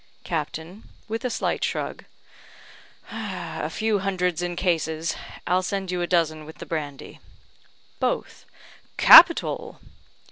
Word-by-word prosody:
Captain 165 Hz, +4 st, -5 dB, 0.3 s
(with 225 Hz, +2 st, -4 dB
a 250 Hz, -, -1 dB
slight -, -, -2 dB
shrug): -, -, -3 dB, 1.1 s
"A 175 Hz, -8 st, -5 dB
few 215 Hz, +4 st, 0 dB
hundreds 180 Hz, -3 st, -1 dB
in 175 Hz, 0 st, -3 dB
cases. 165 Hz, -2 st, -1 dB, 0.3 s
I'll 180 Hz, +1 st, +2 dB
send 190 Hz, 0 st, -3 dB
you 180 Hz, -1 st, -2 dB
a 175 Hz, -, -1 dB
dozen 160 Hz, -3 st, 0 dB
with 160 Hz, +1 st, -12 dB
the -, -, -9 dB
brandy." 145 Hz, -4 st, -6 dB, 0.8 s
Both: -, -, -3 dB, 0.5 s
"Capital!" -, -, +7 dB
175 Hz, 115 wpm, -24 LUFS, 160-190 Hz, 1.1 s, Capital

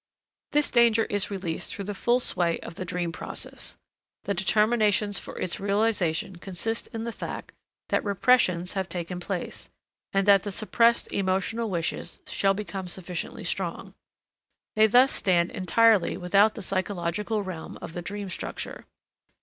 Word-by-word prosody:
This 295 Hz, 0 st, +2 dB
danger 235 Hz, -2 st, +5 dB
is 205 Hz, -1 st, 0 dB
released 185 Hz, -5 st, -3 dB
through 200 Hz, -, -5 dB
the 205 Hz, -, -3 dB
full 240 Hz, +5 st, +2 dB
sway 175 Hz, -8 st, 0 dB
of -, -, -8 dB
the 185 Hz, -, -5 dB
dream 175 Hz, -1 st, -2 dB
process. 165 Hz, -, -6 dB, 0.5 s
The 200 Hz, -, -1 dB
determinations 210 Hz, +1 st, +2 dB
for -, -, -9 dB
its 185 Hz, -, -2 dB
realization 200 Hz, -4 st, 0 dB
consist 195 Hz, +5 st, -3 dB
in 225 Hz, 0 st, -5 dB
the 235 Hz, -, -3 dB
fact -, -, -6 dB, 0.4 s
that -, -, +1 dB
repressions 195 Hz, -4 st, +3 dB
have 190 Hz, -2 st, -2 dB
taken 180 Hz, 0 st, -4 dB
place, 180 Hz, 0 st, -5 dB, 0.4 s
and 195 Hz, 0 st, +1 dB
that 200 Hz, -1 st, +7 dB
the 205 Hz, -, -5 dB
suppressed 230 Hz, +3 st, +2 dB
emotional 200 Hz, +4 st, 0 dB
wishes 175 Hz, -1 st, -3 dB
shall 195 Hz, 0 st, +1 dB
become 195 Hz, -2 st, -5 dB
sufficiently 180 Hz, -1 st, -5 dB
strong. -, -, -3 dB, 0.8 s
They 215 Hz, 0 st, +6 dB
thus 250 Hz, +5 st, +6 dB
stand 175 Hz, -2 st, +2 dB
entirely 210 Hz, +1 st, +3 dB
without 200 Hz, +4 st, +4 dB
the 215 Hz, -, -6 dB
psychological 195 Hz, +3 st, -1 dB
realm 185 Hz, -4 st, -7 dB
of -, -, -8 dB
the 175 Hz, -, -4 dB
dream 200 Hz, +3 st, -5 dB
structure. -, -, -6 dB
195 Hz, 150 wpm, -27 LUFS, 180-215 Hz, 0.8 s, that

